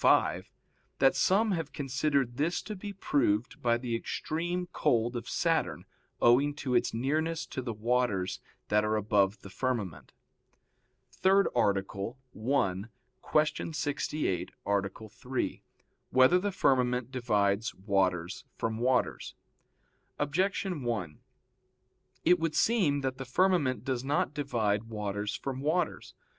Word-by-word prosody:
ii, -, -, +6 dB
5) -, -, +2 dB, 0.5 s
that 135 Hz, 0 st, +4 dB
some 210 Hz, +3 st, +3 dB
have 165 Hz, -5 st, -2 dB
considered 135 Hz, -2 st, 0 dB
this 160 Hz, +4 st, 0 dB
to 215 Hz, -, -6 dB
be 205 Hz, +2 st, -6 dB
proved 125 Hz, -, 0 dB
by 120 Hz, -1 st, +3 dB
the 120 Hz, -1 st, -3 dB
extreme 175 Hz, +9 st, -2 dB
cold 120 Hz, +1 st, +1 dB
of 120 Hz, -, -5 dB
Saturn -, -, 0 dB, 0.3 s
owing 140 Hz, +5 st, +4 dB
to 135 Hz, -3 st, -3 dB
its 120 Hz, -, +2 dB
nearness 155 Hz, +7 st, -1 dB
to 130 Hz, -, -5 dB
the 120 Hz, -2 st, -3 dB
waters 110 Hz, -4 st, 0 dB, 0.3 s
that 105 Hz, 0 st, +3 dB
are 105 Hz, 0 st, +1 dB
above 105 Hz, -1 st, +2 dB
the 100 Hz, -, -9 dB
firmament. 115 Hz, -, -3 dB, 1.0 s
_______________________ -, -, -21 dB
THIRD 195 Hz, +1 st, +4 dB
ARTICLE 100 Hz, +1 st, 0 dB, 0.2 s
[I, 105 Hz, -6 st, 0 dB, 0.6 s
Q. 160 Hz, -, -4 dB
68, 145 Hz, -, -1 dB, 0.2 s
Art. 100 Hz, -1 st, +1 dB, 0.2 s
3] 125 Hz, +4 st, -3 dB, 0.5 s
Whether 130 Hz, +7 st, +5 dB
the 205 Hz, +2 st, -1 dB
Firmament 125 Hz, -7 st, +1 dB
Divides 105 Hz, -4 st, +1 dB
Waters 95 Hz, -2 st, 0 dB
from 110 Hz, 0 st, -2 dB
Waters? 125 Hz, +1 st, 0 dB, 0.8 s
Objection 180 Hz, +2 st, 0 dB
1: 105 Hz, -11 st, -3 dB, 1.1 s
It 180 Hz, +1 st, +5 dB
would 160 Hz, -1 st, -1 dB
seem 180 Hz, -12 st, +3 dB
that 130 Hz, 0 st, -3 dB
the 135 Hz, -, -4 dB
firmament 135 Hz, -, +2 dB
does 130 Hz, -2 st, -1 dB
not 140 Hz, 0 st, 0 dB
divide 115 Hz, -7 st, 0 dB
waters 105 Hz, -2 st, -3 dB
from 135 Hz, -1 st, -4 dB
waters. 160 Hz, +3 st, -1 dB
125 Hz, 130 wpm, -30 LUFS, 105-150 Hz, 1.1 s, ii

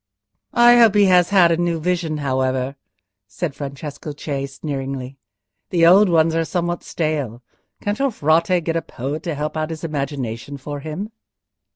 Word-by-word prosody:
"I 240 Hz, 0 st, +7 dB
hope 225 Hz, -3 st, +6 dB
he 205 Hz, -1 st, +6 dB
has 180 Hz, -2 st, +4 dB
had 185 Hz, -4 st, +5 dB
a 165 Hz, -, +2 dB
new 170 Hz, -1 st, 0 dB
vision, 170 Hz, -2 st, -1 dB
however," 130 Hz, 0 st, 0 dB, 0.5 s
said 165 Hz, -, -4 dB
Francesco 145 Hz, +1 st, -7 dB
Cei, 140 Hz, -3 st, -3 dB
sneeringly. 135 Hz, -2 st, -5 dB, 0.5 s
"The 170 Hz, -2 st, +3 dB
old 190 Hz, +4 st, +7 dB
ones 165 Hz, -1 st, +3 dB
are 165 Hz, 0 st, +1 dB
somewhat 175 Hz, +2 st, -2 dB
stale. 145 Hz, -7 st, -3 dB, 0.4 s
Can't 205 Hz, +1 st, -2 dB
your 275 Hz, 0 st, +2 dB
Frate 170 Hz, -, +2 dB
get 165 Hz, +1 st, -2 dB
a 165 Hz, -, +1 dB
poet 140 Hz, +4 st, -5 dB
to 165 Hz, -2 st, -3 dB
help 150 Hz, +2 st, -3 dB
out 155 Hz, 0 st, -2 dB
his 160 Hz, 0 st, -7 dB
imagination 140 Hz, -4 st, -4 dB
for 145 Hz, +2 st, -6 dB
him?" 160 Hz, +9 st, -6 dB
155 Hz, 165 wpm, -21 LUFS, 140-175 Hz, 0.5 s, I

